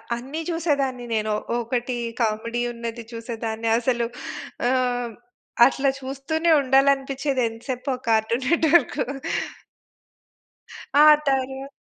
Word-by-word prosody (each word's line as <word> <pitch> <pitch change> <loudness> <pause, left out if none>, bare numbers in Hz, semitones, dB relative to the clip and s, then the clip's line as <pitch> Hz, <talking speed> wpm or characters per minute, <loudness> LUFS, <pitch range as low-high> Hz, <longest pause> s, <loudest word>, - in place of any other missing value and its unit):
అన్నీ 270 +7 -5
జూసేదాన్ని 280 -7 -1
నేను. 215 0 0 0.3
ఒకటి 240 +1 -2 0.3
కామిడీ 230 +2 -1
ఉన్నది 235 0 -6
చూసేదాన్ని, 230 -1 -4
అసలు 240 -1 0 0.6
ఆహ్, 245 -2 0 0.6
అట్లా 275 +1 +1
చూస్తూనే 275 +5 -1
ఉండాలనిపిచ్చేది 270 0 +2
ఎంత 225 0 -9
సేపు 255 +2 -3
ఆ - - -9
కార్టూన్ 225 +3 +1
నెట్‌వర్క్. 330 -3 +3 2.0
ఆ! - - +8 0.3
తర్వార్ 270 0 -1
255 Hz, 95 wpm, -23 LUFS, 235-275 Hz, 2.0 s, ఆ